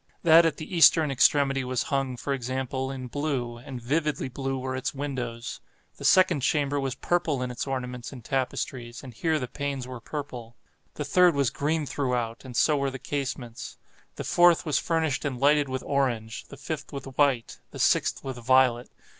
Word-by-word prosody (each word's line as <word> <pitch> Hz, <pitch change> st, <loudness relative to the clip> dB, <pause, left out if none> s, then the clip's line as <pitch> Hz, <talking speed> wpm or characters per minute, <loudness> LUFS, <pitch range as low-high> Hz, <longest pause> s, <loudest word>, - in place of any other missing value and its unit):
That 165 Hz, 0 st, +7 dB
at 165 Hz, -, -2 dB
the 160 Hz, +3 st, -6 dB
eastern 160 Hz, -2 st, +6 dB
extremity 135 Hz, +1 st, +3 dB
was 125 Hz, -1 st, -1 dB
hung, 135 Hz, -2 st, 0 dB
for 140 Hz, -, -2 dB
example, 130 Hz, +1 st, -3 dB
in 130 Hz, -1 st, -5 dB
blue—and 125 Hz, -2 st, -4 dB
vividly 145 Hz, +2 st, -1 dB
blue 135 Hz, +1 st, -3 dB
were 130 Hz, 0 st, -3 dB
its 130 Hz, +2 st, -3 dB
windows. 125 Hz, -4 st, -4 dB, 0.4 s
The -, -, -10 dB
second 185 Hz, -4 st, +5 dB
chamber 145 Hz, 0 st, +1 dB
was 135 Hz, -2 st, -2 dB
purple 155 Hz, -4 st, 0 dB
in 125 Hz, -, -3 dB
its 125 Hz, -, -4 dB
ornaments 125 Hz, -2 st, -4 dB
and 125 Hz, -5 st, -11 dB
tapestries, 130 Hz, -2 st, -3 dB
and 130 Hz, -3 st, -9 dB
here 160 Hz, +7 st, 0 dB
the 130 Hz, -4 st, -3 dB
panes 140 Hz, -2 st, -4 dB
were 130 Hz, -2 st, -8 dB
purple. 125 Hz, -5 st, -7 dB, 0.4 s
The -, -, -4 dB
third 180 Hz, -3 st, +4 dB
was 140 Hz, -5 st, +2 dB
green 155 Hz, +3 st, -1 dB
throughout, 125 Hz, -5 st, -2 dB
and 125 Hz, -3 st, -7 dB
so 150 Hz, +3 st, +4 dB
were 140 Hz, 0 st, 0 dB
the 135 Hz, -, -6 dB
casements. 130 Hz, -4 st, -5 dB, 0.4 s
The -, -, -5 dB
fourth 175 Hz, -1 st, +4 dB
was 150 Hz, -3 st, +1 dB
furnished 160 Hz, -4 st, 0 dB
and 130 Hz, -4 st, -3 dB
lighted 145 Hz, 0 st, +3 dB
with 130 Hz, 0 st, -3 dB
orange—the 125 Hz, -2 st, -2 dB
fifth 150 Hz, +2 st, -5 dB
with 140 Hz, -2 st, -6 dB
white—the 135 Hz, -3 st, -1 dB
sixth -, -, +2 dB
with 130 Hz, -2 st, -5 dB
violet. 125 Hz, 0 st, +3 dB
135 Hz, 175 wpm, -27 LUFS, 125-145 Hz, 0.4 s, That